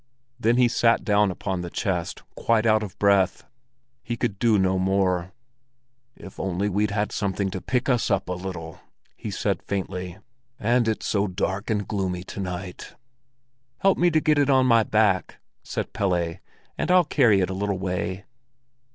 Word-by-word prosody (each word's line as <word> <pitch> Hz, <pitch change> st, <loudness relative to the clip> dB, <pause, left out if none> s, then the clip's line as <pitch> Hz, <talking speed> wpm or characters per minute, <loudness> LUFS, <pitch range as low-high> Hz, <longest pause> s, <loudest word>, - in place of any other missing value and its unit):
Then 120 Hz, +1 st, +2 dB
he 125 Hz, -1 st, +5 dB
sat 115 Hz, 0 st, +2 dB
down 105 Hz, -2 st, +3 dB
upon 95 Hz, 0 st, -3 dB
the 90 Hz, -, -5 dB
chest, 90 Hz, -3 st, -3 dB
quite 115 Hz, -1 st, +1 dB
out 110 Hz, -1 st, +4 dB
of 105 Hz, -3 st, -7 dB
breath. 100 Hz, -2 st, +2 dB, 0.6 s
He 120 Hz, -, -4 dB
could 110 Hz, -5 st, -2 dB
do 115 Hz, -3 st, +4 dB
no 95 Hz, -1 st, +2 dB
more. 95 Hz, -1 st, +1 dB, 0.8 s
"If 95 Hz, -, -12 dB
only 95 Hz, +2 st, -1 dB
we'd 105 Hz, +2 st, +1 dB
had 105 Hz, +1 st, -1 dB
something 100 Hz, -1 st, -1 dB
to 95 Hz, -, -5 dB
pick 125 Hz, 0 st, -1 dB
us 125 Hz, -4 st, +1 dB
up 100 Hz, -, 0 dB
a 90 Hz, -, -2 dB
little!" 90 Hz, -3 st, -7 dB, 0.4 s
he -, -, -6 dB
said -, -, -1 dB
faintly. 95 Hz, -2 st, -4 dB, 0.4 s
"And 120 Hz, +2 st, +2 dB
it's 110 Hz, -, -1 dB
so 100 Hz, 0 st, +1 dB
dark 95 Hz, +3 st, -3 dB
and 105 Hz, -2 st, -1 dB
gloomy 95 Hz, -3 st, -2 dB
to 100 Hz, -, -8 dB
night." 90 Hz, -1 st, -6 dB, 0.8 s
"Help 195 Hz, 0 st, +2 dB
me 175 Hz, -, +4 dB
to 160 Hz, -2 st, +3 dB
get 150 Hz, -1 st, +2 dB
it 145 Hz, -1 st, +2 dB
on 130 Hz, -1 st, +4 dB
my 115 Hz, -2 st, +5 dB
back," 105 Hz, -3 st, +1 dB, 0.3 s
said -, -, -4 dB
Pelle, 85 Hz, -4 st, 0 dB, 0.4 s
"and -, -, -1 dB
I'll 180 Hz, -1 st, +5 dB
carry 115 Hz, -10 st, +4 dB
it 95 Hz, -, 0 dB
a -, -, -2 dB
little 100 Hz, 0 st, -1 dB
way." 95 Hz, +1 st, -3 dB
100 Hz, 175 wpm, -24 LUFS, 95-115 Hz, 0.8 s, he